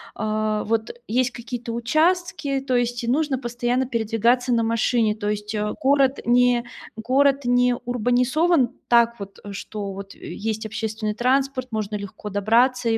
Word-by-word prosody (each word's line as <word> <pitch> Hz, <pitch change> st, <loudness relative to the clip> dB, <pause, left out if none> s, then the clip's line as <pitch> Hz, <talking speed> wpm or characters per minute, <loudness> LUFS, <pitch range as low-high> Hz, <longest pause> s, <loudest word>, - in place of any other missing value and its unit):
а, 215 Hz, 0 st, -1 dB
вот 225 Hz, 0 st, -1 dB, 0.2 s
есть 250 Hz, +2 st, +1 dB
какие-то 240 Hz, 0 st, -6 dB
участки, 315 Hz, +4 st, +1 dB
то 265 Hz, -1 st, -1 dB
есть 245 Hz, 0 st, 0 dB
и -, -, -5 dB
нужно 275 Hz, +1 st, +1 dB
постоянно 240 Hz, +1 st, -1 dB
передвигаться 235 Hz, +2 st, +1 dB
на 230 Hz, -, +3 dB
машине, 225 Hz, -1 st, +1 dB
то 210 Hz, -1 st, -3 dB
есть 210 Hz, 0 st, -3 dB
а 210 Hz, 0 st, -1 dB
город 275 Hz, 0 st, +3 dB
не 245 Hz, 0 st, +3 dB, 0.3 s
город 275 Hz, +4 st, +2 dB
не 245 Hz, 0 st, +3 dB
урбанизован 250 Hz, +5 st, +2 dB, 0.2 s
так 235 Hz, -1 st, +4 dB
вот, 200 Hz, 0 st, -9 dB
э, 205 Hz, -, -7 dB
что 200 Hz, 0 st, -6 dB
вот 195 Hz, +1 st, -9 dB
и -, -, -9 dB
есть 220 Hz, +1 st, -3 dB
общественный 220 Hz, -1 st, -3 dB
транспорт, 260 Hz, +1 st, 0 dB
можно 215 Hz, -1 st, -3 dB
легко 200 Hz, +1 st, -7 dB
добраться 230 Hz, +5 st, +2 dB
и, 225 Hz, -, +2 dB
240 Hz, 155 wpm, -23 LUFS, 215-255 Hz, 0.3 s, так